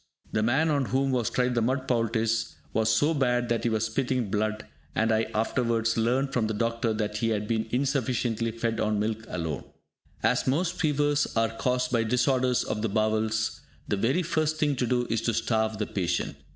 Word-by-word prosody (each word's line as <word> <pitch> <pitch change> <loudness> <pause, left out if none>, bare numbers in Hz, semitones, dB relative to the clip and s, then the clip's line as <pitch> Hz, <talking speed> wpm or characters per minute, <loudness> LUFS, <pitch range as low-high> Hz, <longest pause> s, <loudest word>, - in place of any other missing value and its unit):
The 110 - +1
man 135 +8 +2
on 140 -2 +1
whom 135 +2 +1
was 125 -3 +1
tried 125 0 +1
the 120 - +1
mud 130 +3 0
poultice 115 -1 0 0.2
was 110 0 +2
so 145 +9 +3
bad 125 -4 +1
that 115 -1 0
he 120 - +2
was 110 0 0
spitting 125 -1 -1
blood, 110 +1 -1 0.3
and 115 0 +2
I 110 0 +2
afterwards 115 0 +1
learnt 130 +4 +1
from 115 -4 +1
the 110 - -2
doctor 115 +1 0
that 105 -1 -2
he 115 +1 0
had 105 -1 -1
been 110 0 0
insufficiently 125 -3 0
fed 115 0 -2
on 105 -1 +1
milk 110 +1 -2
alone. 80 -5 -3 0.6
As - - +2
most 170 +7 0
fevers 145 -2 +2
are 115 0 +2
caused 125 +1 0
by 115 -2 +2
disorders 125 +2 +2
of 105 - -3
the 110 - 0
bowels, 110 +1 0 0.3
the - - +1
very 130 - +1
first 155 -2 0
thing 145 -2 +1
to 125 - 0
do 125 0 +1
is 115 -1 0
to 115 0 0
starve 110 -1 0
the 105 - -1
patient. 90 -4 -2
115 Hz, 195 wpm, -27 LUFS, 110-130 Hz, 0.6 s, so